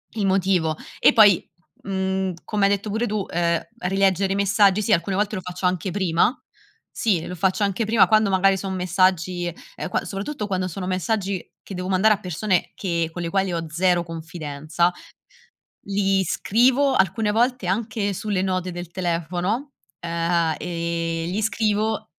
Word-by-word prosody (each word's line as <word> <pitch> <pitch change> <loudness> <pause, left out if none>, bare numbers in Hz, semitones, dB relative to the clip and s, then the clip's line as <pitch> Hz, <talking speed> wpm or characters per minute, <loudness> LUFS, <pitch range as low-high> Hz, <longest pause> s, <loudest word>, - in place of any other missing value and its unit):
il 210 -3 0
motivo 185 -5 +1 0.2
e - - +6
poi, 210 -5 +5 0.4
mhmm, 190 -1 -1
come 205 -2 +1
hai 200 - +3
detto 200 +1 -1
pure 220 +3 0
tu, 210 -2 -2
ehm, 170 -1 +1 0.2
rileggere 195 0 +1
i - - -2
messaggi 200 0 +3
sì, 215 +1 +2
alcune 190 +2 +1
volte 210 +1 0
lo 185 - -4
faccio 180 +1 -6
anche 180 +1 0
prima 185 - +1 0.6
sì 190 -8 +1
lo - - -6
faccio 190 +4 +1
anche 200 +3 0
prima 220 -1 +4
quando 215 -2 +4
magari 195 0 +3
son 190 0 -4
messaggi, 180 -1 +1 0.2
ehm, - - -5
qua 180 - -1
soprattutto 205 +5 -4
quando 185 -2 -1
sono 180 +2 -5
messaggi 190 +1 -1 0.2
che 195 - -9
devo 180 +1 -4
mandare 195 +3 +4
a - - -12
persone 185 0 -1
che 170 -4 -1
con 175 - -6
le 170 - -2
quali 195 +1 0
ho 165 -1 -2
0 175 +2 +2
confidenza 160 0 -2 1.0
li 195 -1 +1
scrivo 255 - +2
alcune 210 +2 +1
volte 240 -1 +1
anche 210 +1 -1
sulle 200 -1 -2
note 185 -1 -1
del 175 -1 -7
telefono, 180 - -2 0.3
ehm, 170 -1 0
gli 170 +2 -2
scrivo 215 0 0
190 Hz, 160 wpm, -23 LUFS, 175-205 Hz, 1.0 s, e